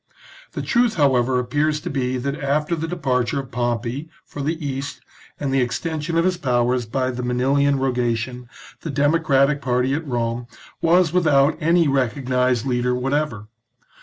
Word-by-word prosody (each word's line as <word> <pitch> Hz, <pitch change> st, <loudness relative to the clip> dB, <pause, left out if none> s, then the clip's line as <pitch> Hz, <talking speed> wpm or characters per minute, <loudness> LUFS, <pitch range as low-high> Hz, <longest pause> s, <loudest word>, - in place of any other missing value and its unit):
The -, -, -4 dB
truth, 240 Hz, -2 st, +2 dB
however, 130 Hz, -5 st, +3 dB
appears 145 Hz, +5 st, 0 dB
to -, -, -5 dB
be 130 Hz, -2 st, -1 dB
that 140 Hz, +3 st, -2 dB
after 150 Hz, +2 st, 0 dB
the 165 Hz, 0 st, -3 dB
de 175 Hz, -, -4 dB
parture 130 Hz, -5 st, 0 dB
of 135 Hz, -2 st, -5 dB
Pompey 120 Hz, +4 st, -2 dB, 0.2 s
for 145 Hz, -, -7 dB
the 155 Hz, +4 st, -1 dB
East, 140 Hz, -3 st, -5 dB, 0.4 s
and 140 Hz, -2 st, -2 dB
the 135 Hz, -, +3 dB
extension 155 Hz, +7 st, -2 dB
of 165 Hz, -, +3 dB
his 185 Hz, -1 st, +1 dB
powers 125 Hz, -4 st, +1 dB
by 130 Hz, +3 st, -1 dB
the 125 Hz, 0 st, -5 dB
Manilian 135 Hz, +3 st, +2 dB
rogation, 125 Hz, -1 st, -1 dB, 0.3 s
the 165 Hz, -, -5 dB
democratic 145 Hz, -1 st, +2 dB
party 125 Hz, 0 st, +1 dB
at 155 Hz, +2 st, -3 dB
Rome 120 Hz, -1 st, -2 dB, 0.3 s
was 170 Hz, 0 st, +3 dB
without 155 Hz, -5 st, +4 dB
any 165 Hz, +1 st, +3 dB
recognised 125 Hz, -2 st, +1 dB
leader 125 Hz, -1 st, 0 dB
whatever. 135 Hz, -3 st, -1 dB
135 Hz, 160 wpm, -22 LUFS, 125-150 Hz, 0.4 s, without